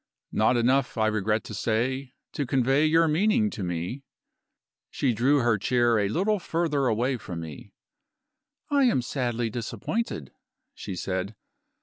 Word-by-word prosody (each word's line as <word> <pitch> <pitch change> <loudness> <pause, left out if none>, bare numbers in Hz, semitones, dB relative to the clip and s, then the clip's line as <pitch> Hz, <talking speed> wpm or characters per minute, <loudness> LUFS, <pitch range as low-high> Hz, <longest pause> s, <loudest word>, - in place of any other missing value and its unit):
"Not 110 +3 +3
enough, 125 +2 +2
I 110 - +2
regret 110 0 0
to - - -8
say, 125 +5 -1 0.2
to 145 - -3
convey 135 +4 +3
your 165 +1 +4
meaning 210 +7 +2
to 105 - -6
me." 90 +8 -3 0.9
She 130 -4 0
drew 130 +6 +3
her 120 -3 +2
chair 120 +1 +2
a 100 - +1
little 200 - +1
further 160 -6 0
away 125 +3 +1
from 90 -6 -7
me. 80 -4 -9 1.0
"I 280 -2 +4
am 180 - +2
sadly 120 -3 -2
disappointed," 120 - -3 0.4
she 95 - -6
said. 95 +3 -3
120 Hz, 140 wpm, -26 LUFS, 110-145 Hz, 1.0 s, your